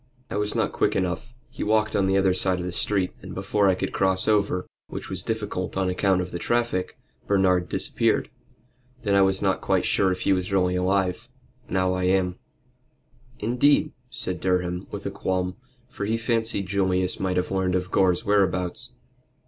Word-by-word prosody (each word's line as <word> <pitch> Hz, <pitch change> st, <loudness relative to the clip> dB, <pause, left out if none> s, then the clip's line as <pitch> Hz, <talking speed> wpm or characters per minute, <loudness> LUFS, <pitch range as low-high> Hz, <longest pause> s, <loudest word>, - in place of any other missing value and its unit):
"I -, -, -3 dB
was 105 Hz, 0 st, -1 dB
not -, -, +1 dB
quick -, -, +1 dB
enough. 95 Hz, +4 st, -2 dB, 0.2 s
He 130 Hz, -, -5 dB
walked 110 Hz, 0 st, +1 dB
on 95 Hz, -1 st, +2 dB
the 95 Hz, 0 st, +3 dB
other 95 Hz, -1 st, +3 dB
side 95 Hz, 0 st, 0 dB
of 90 Hz, -, -4 dB
the 90 Hz, -, -3 dB
street, 95 Hz, 0 st, -1 dB
and -, -, -8 dB
before 100 Hz, +1 st, +2 dB
I 95 Hz, -, +3 dB
could -, -, -3 dB
cross 95 Hz, -1 st, +1 dB
over, 100 Hz, -4 st, +2 dB, 0.2 s
which -, -, -7 dB
was -, -, -2 dB
difficult 105 Hz, -5 st, -3 dB
on 95 Hz, -1 st, +1 dB
account 95 Hz, 0 st, +2 dB
of 90 Hz, -, -5 dB
the 85 Hz, -, -4 dB
traffic, 120 Hz, -5 st, -1 dB, 0.3 s
Bernard 95 Hz, -3 st, +2 dB
disappeared. -, -, 0 dB, 0.7 s
Then 100 Hz, -3 st, +1 dB
I 100 Hz, -, +5 dB
was 95 Hz, +1 st, +2 dB
not 95 Hz, -1 st, +1 dB
quite -, -, +1 dB
sure 95 Hz, -1 st, +2 dB
if 90 Hz, -, -3 dB
he 100 Hz, -, +3 dB
really 90 Hz, 0 st, +1 dB
was 90 Hz, -, 0 dB
alive. 95 Hz, +4 st, 0 dB, 0.4 s
Now 95 Hz, -1 st, +1 dB
I 90 Hz, 0 st, -1 dB
am." 90 Hz, -1 st, +1 dB, 1.0 s
"Indeed?" 140 Hz, +7 st, +2 dB, 0.2 s
said 90 Hz, -8 st, -4 dB
Durham, 90 Hz, -1 st, -1 dB
with -, -, -7 dB
a -, -, -2 dB
qualm, 90 Hz, 0 st, -2 dB, 0.3 s
for 100 Hz, -, -5 dB
he 110 Hz, +2 st, 0 dB
fancied 115 Hz, -3 st, 0 dB
Julius 95 Hz, -1 st, +1 dB
might 95 Hz, -1 st, -1 dB
have 90 Hz, -, -1 dB
learned 95 Hz, -1 st, +1 dB
of 90 Hz, +1 st, -2 dB
Gore's 90 Hz, -2 st, +2 dB
whereabouts. 90 Hz, -3 st, 0 dB
95 Hz, 185 wpm, -25 LUFS, 90-100 Hz, 1.0 s, I